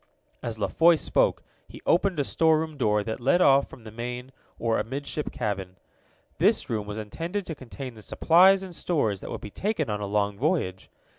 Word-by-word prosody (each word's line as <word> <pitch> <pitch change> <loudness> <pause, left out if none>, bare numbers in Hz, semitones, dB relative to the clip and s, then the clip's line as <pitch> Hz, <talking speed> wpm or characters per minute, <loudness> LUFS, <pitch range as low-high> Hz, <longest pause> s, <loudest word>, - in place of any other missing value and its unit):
As 115 -2 -4
La 105 - 0
Foy 170 +1 +5
spoke, - - +1 0.2
he - - -11
opened 180 -1 +2
a - - +3
storeroom 160 +1 +1
door 105 -6 +1
that 110 +3 -4
led 135 +8 +3
off 140 -5 +5
from 120 - -13
the 110 - -10
main, 125 +3 -6 0.3
or 115 -1 0
amidship, 140 +4 -4
cabin. 95 -3 -4 0.6
This - - +2
room 105 -2 -2
was 105 0 -5
intended 165 - -4
to 165 - -5
contain 130 -2 -8
the 110 - -13
supplies 185 - +5
and 180 -2 -8
stores 110 - -1
that - - -7
would - - -5
be 105 - -8
taken 185 - -2
on 105 0 -3
a 100 - -3
long 100 0 0
voyage. 130 - -1
130 Hz, 195 wpm, -26 LUFS, 105-160 Hz, 0.6 s, Foy